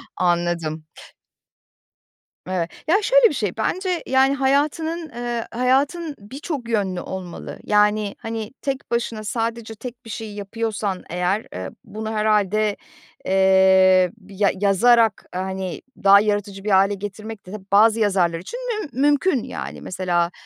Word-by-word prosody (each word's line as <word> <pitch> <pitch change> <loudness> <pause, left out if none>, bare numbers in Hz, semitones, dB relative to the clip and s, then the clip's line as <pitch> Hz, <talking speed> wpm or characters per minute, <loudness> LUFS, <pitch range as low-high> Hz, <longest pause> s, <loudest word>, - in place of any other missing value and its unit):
Anladım. 170 -3 -1 1.6
Evet. 180 -2 -1 0.2
Ya, 395 +7 +4
şöyle - - +5
bir - - -4
şey: 210 -9 -2
Bence, 360 - -1
yani, 265 +1 +3
hayatının, 305 +5 0
eee, 240 -2 -4
hayatın 280 +6 +1
birçok 260 - -6
yönlü 195 -5 0
olmalı. 185 -2 -7
Yani, 210 0 +2
hani, 225 -1 -5
tek 275 -1 -4
başına 230 -2 -1
sadece 225 0 -3
tek 245 +2 -9
bir - - -10
şey 220 -1 -6
yapıyorsan, 205 -1 -3
eğer, 180 +5 -1
eee, 95 +1 -5
bunu 220 +1 -6
herhâlde, 215 -1 +1 0.5
eee, 190 -1 +5 0.2
ya 200 0 +1
yazarak, 225 +2 +4
hani, 190 -1 -4 0.2
daha 200 0 +8
yaratıcı 205 -1 -1
bir 210 - -2
hâle 195 +1 +4
getirmek 205 +2 -7
de 185 - -11 0.2
bazı 220 +2 +5
yazarlar 185 -5 +2
için 475 - -7 0.2
müm 315 - -7
mümkün, 290 -1 +3
yani. 70 -2 -6
Mesela, 175 -2 -1
210 Hz, 130 wpm, -22 LUFS, 190-240 Hz, 1.6 s, daha